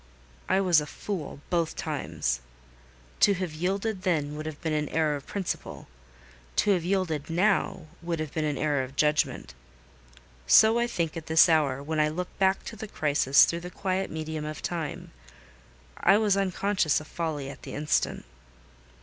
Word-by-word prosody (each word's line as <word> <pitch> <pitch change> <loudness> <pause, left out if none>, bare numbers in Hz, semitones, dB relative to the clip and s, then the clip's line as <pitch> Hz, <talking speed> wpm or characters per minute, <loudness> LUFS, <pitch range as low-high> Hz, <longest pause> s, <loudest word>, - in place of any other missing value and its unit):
I 190 - +3
was 175 -5 +4
a 150 - -6
fool 165 -5 -6
both 170 -2 0
times. - - -2 0.8
To 200 - +5
have 180 -3 -4
yielded 195 +5 -2
then 150 -6 0
would 155 +1 -5
have 155 -2 -6
been 160 -2 -2
an 150 -1 -1
error 155 -2 +1
of 140 - -8
principle; 195 -3 -4 0.7
to 205 - +3
have 180 -4 +2
yielded 170 -5 -1
now 185 0 +1 0.2
would 170 -1 -3
have 155 -2 -4
been 155 - -1
an 150 -2 -1
error 145 -3 +1
of 130 +1 -7
judgment. 150 +1 +1 0.9
So 220 - +6
I 240 - +1
think 170 -9 -2
at 165 -1 -7
this 160 +2 +6
hour, 145 -5 +2
when 155 +1 -2
I 150 0 +3
look 175 +4 -5
back 190 0 +2
to - - -7
the 220 +1 -7
crisis 145 -6 +4
through 170 - -2
the 175 +1 -7
quiet 190 +1 -2
medium 155 -1 -4
of 155 0 -6
time: 165 -4 -4 0.9
I 195 +3 +5
was 210 -2 +3
unconscious 195 -4 +1
of 150 - -10
folly 155 -4 -4
at - - -13
the - - -8
instant. 150 - 0
160 Hz, 175 wpm, -27 LUFS, 150-190 Hz, 0.9 s, So